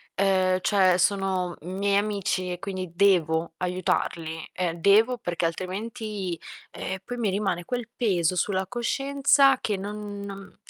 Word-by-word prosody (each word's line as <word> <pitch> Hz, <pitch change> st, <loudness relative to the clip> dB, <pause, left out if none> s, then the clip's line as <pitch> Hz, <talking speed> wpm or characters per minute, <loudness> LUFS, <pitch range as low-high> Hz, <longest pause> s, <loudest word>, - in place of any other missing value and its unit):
Uhm, 185 Hz, -1 st, +2 dB
cioè 185 Hz, -2 st, +3 dB
sono 190 Hz, -2 st, +1 dB
miei 195 Hz, +4 st, 0 dB
amici 200 Hz, -3 st, -1 dB
e 175 Hz, -, -4 dB
quindi 185 Hz, -2 st, -5 dB
devo 170 Hz, -4 st, +2 dB
aiutarli; 170 Hz, -3 st, -2 dB
ehm, 175 Hz, -2 st, -2 dB
devo 220 Hz, +7 st, +5 dB
perché 175 Hz, -4 st, -2 dB
altrimenti, 190 Hz, +1 st, -4 dB, 0.3 s
ehm, 190 Hz, 0 st, -5 dB
poi 245 Hz, +3 st, -6 dB
mi 215 Hz, -5 st, 0 dB
rimane 190 Hz, -4 st, -1 dB
quel 245 Hz, -2 st, -3 dB
peso 185 Hz, -7 st, +1 dB
sulla 190 Hz, +1 st, 0 dB
coscienza 275 Hz, +3 st, +3 dB
che 210 Hz, -, -1 dB
non 205 Hz, +1 st, -6 dB
non 195 Hz, -1 st, -9 dB
195 Hz, 135 wpm, -26 LUFS, 180-210 Hz, 0.3 s, devo